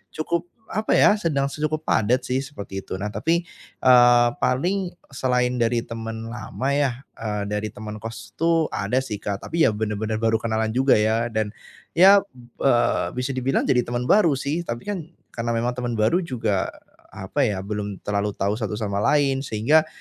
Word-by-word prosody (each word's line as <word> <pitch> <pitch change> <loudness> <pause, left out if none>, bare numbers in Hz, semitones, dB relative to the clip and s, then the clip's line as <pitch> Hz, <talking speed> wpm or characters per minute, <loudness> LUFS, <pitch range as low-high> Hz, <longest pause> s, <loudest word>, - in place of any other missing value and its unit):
cukup 170 +2 -2 0.2
apa 215 +2 -2
ya, 210 - +6
sedang 150 -8 0
cukup 155 +2 -2
padat 120 +5 +2
sih 130 +2 0
seperti 100 -8 -7
itu. 95 - -6
Nah 105 - -2
tapi, 165 +10 0 0.4
eee, 120 -1 +6
paling 180 +8 0 0.2
selain 125 -2 0
dari 120 0 +1
teman 115 -1 -6
lama 120 +2 -5
ya, 140 -2 +2 0.2
eee, 105 -2 -3
dari 105 +1 -3
teman 105 0 -7
kos 115 -2 -8
tuh 165 -1 +2
ada 110 +6 -1
sih, 125 -5 -4
Kak, 100 -1 -5
tapi 165 -1 +1
ya 110 - +5
benar-benar 110 +1 -2
baru 115 0 +2
kenalan 110 0 0
juga 130 -3 +4
ya 115 +2 +1
dan 110 -1 -2 0.4
ya, 195 +4 +8 0.4
eee, 120 -3 +2
bisa 125 +2 -2
dibilang 130 +1 0
jadi 125 - +2
teman 120 0 -2
baru 175 -9 +5
sih, 140 +5 -2
tapi 120 0 -4
kan 190 -6 -4 0.2
karena 115 0 -2
memang 120 +2 0
teman 125 -1 -3
baru 110 +11 +2
juga 115 - -1 0.5
apa 95 +9 0
ya, 100 -3 -2
belum 105 -1 -5
terlalu 100 0 -1
tahu 100 +4 -1
satu 110 -1 -2
sama 100 -2 -2
lain 140 +2 +2
sehingga 140 +6 +2
120 Hz, 175 wpm, -23 LUFS, 110-140 Hz, 0.5 s, ya